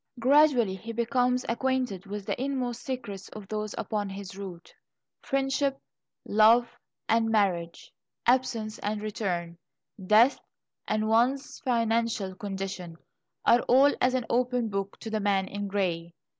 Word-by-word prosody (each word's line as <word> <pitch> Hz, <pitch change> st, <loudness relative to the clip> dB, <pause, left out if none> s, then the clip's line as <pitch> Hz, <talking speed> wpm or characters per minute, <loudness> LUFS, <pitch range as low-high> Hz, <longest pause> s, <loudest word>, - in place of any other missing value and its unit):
Gradually 260 Hz, -5 st, +4 dB
he 225 Hz, +5 st, -7 dB
becomes 250 Hz, +2 st, +1 dB
acquainted 240 Hz, -5 st, -1 dB
with 205 Hz, 0 st, -6 dB
the -, -, -3 dB
inmost 255 Hz, -4 st, -2 dB
secrets 205 Hz, -8 st, -6 dB
of 210 Hz, -2 st, -9 dB
those 215 Hz, 0 st, -4 dB
upon 210 Hz, -2 st, -2 dB
his 195 Hz, -1 st, -8 dB
route. 190 Hz, -3 st, -9 dB, 0.5 s
Friendship, 270 Hz, 0 st, 0 dB, 0.5 s
love, 225 Hz, +3 st, +5 dB, 0.4 s
and 225 Hz, 0 st, +2 dB
marriage, 180 Hz, -6 st, 0 dB, 0.3 s
absence 235 Hz, -4 st, +1 dB
and 210 Hz, +1 st, -2 dB
return, 180 Hz, -5 st, -3 dB, 0.4 s
death, 220 Hz, +7 st, +5 dB, 0.5 s
and 215 Hz, 0 st, 0 dB
one's 255 Hz, +6 st, +1 dB
financial 230 Hz, -5 st, 0 dB
condition, 190 Hz, -3 st, -5 dB, 0.5 s
are 240 Hz, -, +5 dB
all 275 Hz, +3 st, +6 dB
as 255 Hz, +1 st, +3 dB
an 250 Hz, -2 st, -1 dB
open 245 Hz, -1 st, 0 dB
book 195 Hz, -1 st, -3 dB
to 225 Hz, -, -6 dB
the 215 Hz, -, 0 dB
man 200 Hz, -2 st, +1 dB
in 205 Hz, +1 st, -4 dB
grey. 175 Hz, -4 st, -2 dB
215 Hz, 130 wpm, -28 LUFS, 195-250 Hz, 0.5 s, all